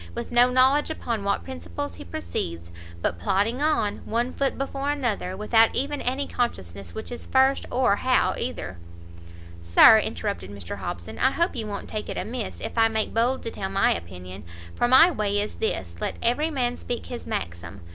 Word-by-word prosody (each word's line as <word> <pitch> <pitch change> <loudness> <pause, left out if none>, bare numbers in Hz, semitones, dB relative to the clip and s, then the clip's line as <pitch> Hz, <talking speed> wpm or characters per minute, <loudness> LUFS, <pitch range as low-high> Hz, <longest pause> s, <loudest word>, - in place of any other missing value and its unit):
with - - -5
no 245 +1 +5
knowledge 260 +4 +4
upon 230 -9 -3
what 200 - 0
principles 85 +2 -6
he 85 - -10
proceeds, 85 0 -5 0.3
but 85 - -1
plodding 205 - 0
on, 295 -9 +1
one 240 +3 -2
foot 275 -1 -1
before 275 +1 -3
another, 235 -10 -1
without 225 +2 +4
even 285 +2 0
any 265 +3 -1
consciousness 95 - -4
which - - -6
is 240 - -7
first, 265 +1 +3
or 245 -5 +2
how 255 +3 +2
either 95 - -4 0.4
" 85 0 -16
"Sir," 85 0 +8
interrupted 95 +2 -3
Mr 100 -1 -7
Hobson, 85 -3 -6
"I 260 - +4
hope 340 +6 0
you 225 -3 -3
won't 205 - -5
take 215 -1 -5
it - - -4
amiss 235 -1 -4
if - - -3
I 225 - +6
make 220 -1 -1
bold 240 +4 +1
to 230 - -4
tell 190 - -4
my 195 +1 +3
opinion, 90 +3 -8 0.3
for 240 - +1
my 325 +8 +7
way 205 -6 0
is 210 +1 -2
this, 95 - -2
let - - -2
every 270 +7 +2
man 245 -5 -1
speak 240 - -5
his 240 -1 -7
maxim! 85 +1 -5
220 Hz, 185 wpm, -25 LUFS, -, 0.4 s, Sir